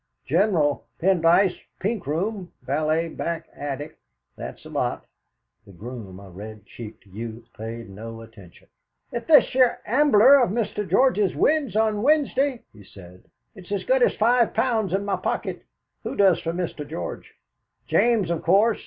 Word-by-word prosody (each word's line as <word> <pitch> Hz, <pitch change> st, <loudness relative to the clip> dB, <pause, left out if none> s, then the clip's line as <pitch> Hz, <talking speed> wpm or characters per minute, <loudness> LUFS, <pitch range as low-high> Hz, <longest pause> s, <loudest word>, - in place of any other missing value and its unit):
General 165 Hz, -3 st, +1 dB
Pendyce, 180 Hz, +1 st, +3 dB, 0.2 s
pink 205 Hz, -, -2 dB
room; 185 Hz, +5 st, -2 dB
valet, 155 Hz, +4 st, 0 dB
back 170 Hz, 0 st, -4 dB
attic. 145 Hz, +2 st, -6 dB, 0.4 s
That's -, -, -8 dB
the -, -, -12 dB
lot." -, -, -2 dB, 0.6 s
The 100 Hz, -, -14 dB
groom, 105 Hz, -1 st, -9 dB
a 100 Hz, -, -12 dB
red 105 Hz, +3 st, -10 dB
cheeked 110 Hz, -2 st, -11 dB
youth, 115 Hz, +4 st, -8 dB
paid 115 Hz, +1 st, -7 dB
no 115 Hz, +3 st, -9 dB
attention. 105 Hz, -6 st, -16 dB, 0.4 s
"If 235 Hz, -1 st, -5 dB
this 310 Hz, -2 st, +6 dB
here 255 Hz, -2 st, +3 dB
Ambler 270 Hz, +1 st, +6 dB
of 245 Hz, -, +2 dB
Mr. 210 Hz, -1 st, -2 dB
George's 210 Hz, -8 st, +3 dB
wins 295 Hz, -8 st, +1 dB
on 215 Hz, -1 st, +1 dB
Wednesday," 280 Hz, -2 st, +1 dB
he 105 Hz, -, -15 dB
said, 90 Hz, -1 st, -15 dB, 0.3 s
"it's 190 Hz, -2 st, -14 dB
as 200 Hz, -, -1 dB
good -, -, +2 dB
as 485 Hz, -, +3 dB
five 235 Hz, +1 st, +2 dB
pounds 220 Hz, -4 st, +1 dB
in 195 Hz, +2 st, -1 dB
my 200 Hz, -, 0 dB
pocket. -, -, -3 dB, 0.4 s
Who -, -, -5 dB
does 195 Hz, -4 st, +4 dB
for 165 Hz, -, -2 dB
Mr. 175 Hz, -2 st, -4 dB
George?" 165 Hz, -, -6 dB, 0.5 s
"James, 225 Hz, -8 st, +2 dB
of 170 Hz, -, -1 dB
course." 205 Hz, +6 st, +3 dB
180 Hz, 155 wpm, -24 LUFS, -, 0.6 s, this